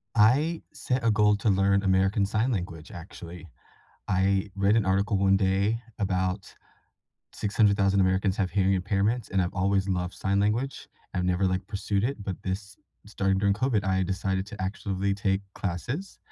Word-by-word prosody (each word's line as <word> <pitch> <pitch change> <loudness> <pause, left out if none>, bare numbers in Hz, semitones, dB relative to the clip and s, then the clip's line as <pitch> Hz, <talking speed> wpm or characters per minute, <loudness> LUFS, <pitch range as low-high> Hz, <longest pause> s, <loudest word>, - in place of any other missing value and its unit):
I 140 +10 +3
set 125 -3 -2
a 115 - +4
goal 105 -1 +3
to 105 +1 0
learn 100 +1 +3
American 95 +1 +2
Sign 110 +6 0
Language, 85 -6 -4
actually. 85 0 -10 0.6
I 95 +1 +1
read 100 +2 +3
an 115 - +3
article 100 +2 +1
one 95 0 +4
day 100 +4 +1 0.2
about 95 -1 -2 0.8
600,000 100 -1 +2
Americans 95 +1 +2
have 95 -2 0
hearing 95 +1 +2
impairments, 100 +5 -1
and 95 - +1
I've 90 - -2
always 95 0 +1
loved 90 -1 -1
sign 100 0 -1
language. 110 +7 -1 0.3
I've 90 - 0
never, 90 +1 +1
like, 95 +1 -1
pursued 100 0 -1
it, 125 -4 -2
but 95 -3 -5
this 95 0 -5 0.3
starting 95 -2 0
during 100 0 +2
COVID, 110 -1 0
I 95 0 +1
decided 95 0 -1
to 105 -2 -9
actually 100 0 -2
take 100 -1 0
classes. 120 - -4
100 Hz, 160 wpm, -27 LUFS, 95-105 Hz, 0.8 s, a